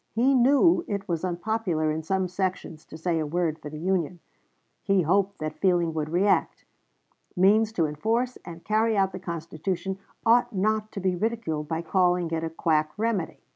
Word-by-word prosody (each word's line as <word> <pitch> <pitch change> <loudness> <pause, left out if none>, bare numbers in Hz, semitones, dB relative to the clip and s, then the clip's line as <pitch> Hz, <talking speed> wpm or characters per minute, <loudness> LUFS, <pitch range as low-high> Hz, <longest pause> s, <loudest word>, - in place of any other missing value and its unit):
He 255 +4 +3
knew 285 +7 +4
it 200 -1 -3
was 170 -2 -2
unpopular 175 -3 -1
in 155 +1 -2
some 190 +3 -1
sections 180 -3 -4
to 155 - -10
say 165 0 -1
a 155 - -1
word 165 0 -1
for 150 - -8
the 155 - -8
Union. 175 0 -1 0.6
He 195 -3 +2
hoped 195 +4 +1
that 155 0 -5
feeling 175 -4 +2
would 155 -1 -2
react. 185 +5 +1 0.7
Means 210 +4 +4
to 170 -7 +1
enforce 225 +12 -1
and 170 -1 -11
carry 220 +1 +2
out 195 -1 +2
the 185 - -7
Constitution 170 +2 -4 0.3
ought 240 +1 +4
not 215 +2 0
to - - -4
be 185 -1 0
ridiculed 175 -7 -2
by 160 +2 -2
calling 180 -1 +1
it 165 0 -1
a 165 - -2
quack 155 -1 +1
remedy. 215 -6 -2
185 Hz, 175 wpm, -26 LUFS, 165-210 Hz, 0.7 s, knew